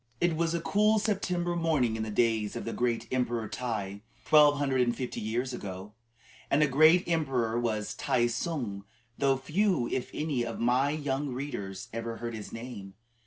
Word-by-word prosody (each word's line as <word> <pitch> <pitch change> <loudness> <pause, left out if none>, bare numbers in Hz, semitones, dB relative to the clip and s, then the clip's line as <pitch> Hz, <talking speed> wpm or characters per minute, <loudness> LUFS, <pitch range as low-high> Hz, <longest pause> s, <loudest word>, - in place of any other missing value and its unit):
It 175 -2 +2
was 165 +1 0
a - - 0
cool 210 +4 +3
September 180 -5 0
morning 155 -9 +1
in 110 - -3
the 110 - -3
days 110 -1 +1
of - - -5
the 115 - -3
great 120 -1 -1
Emperor 120 -3 0
Tai, 100 -5 -4 0.2
twelve 150 -1 +6
hundred 135 -2 +1
and 120 -1 +1
fifty 125 -2 -4
years 120 +4 -2
ago. 100 -2 -7 0.6
And 145 +2 +4
a - - +4
great 155 +6 +5
emperor 130 -9 0
was 110 -3 -1
Tai 120 -1 +1
tsung, 120 -5 -3 0.3
though 135 -1 +3
few, 170 - +1
if 125 - -2
any, 150 -5 -1
of 115 -1 -5
my 125 +4 +3
young 145 -1 -2
readers 125 -8 -5
ever 115 0 -4
heard 115 0 -5
his 110 -2 -7
name. 115 -5 -8
125 Hz, 175 wpm, -29 LUFS, 115-150 Hz, 0.6 s, twelve